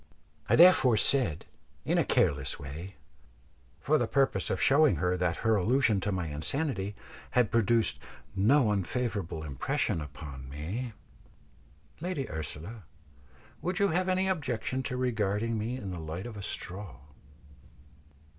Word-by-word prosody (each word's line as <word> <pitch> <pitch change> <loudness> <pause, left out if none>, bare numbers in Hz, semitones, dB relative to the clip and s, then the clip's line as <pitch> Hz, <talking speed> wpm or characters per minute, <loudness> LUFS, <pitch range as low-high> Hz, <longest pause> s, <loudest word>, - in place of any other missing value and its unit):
I - - +5
therefore 160 -9 +7
said, 110 - +2 0.4
in - - +2
a - - +4
careless 70 -1 +1
way, 80 +7 -8 0.8
for 150 +4 +2
the 120 - 0
purpose 135 +2 +1
of - - -1
showing 150 +2 +5
her 90 0 0
that 90 -2 0
her 110 0 +4
allusion 110 +1 +3
to 105 - -1
my 90 -3 -2
insanity 100 - -2 0.4
had 120 -4 +4
produced 115 0 +2 0.4
no 110 +4 +4
unfavourable 100 -5 -2
impression 95 - -1
upon 70 -3 -9
me, 95 - -5 1.1
"Lady 170 -5 -3
Ursula, 80 +7 -6 0.8
would 180 0 -2
you 200 0 +3
have 185 +3 0
any 185 +1 +1
objection 130 -8 -2
to 125 -1 -4
regarding 110 -2 0
me 120 +4 -3
in 100 -6 -6
the 90 - -5
light 80 +4 -6
of 120 -2 -7
a 100 - -7
straw?" 95 -6 -5
110 Hz, 135 wpm, -29 LUFS, 90-130 Hz, 1.1 s, therefore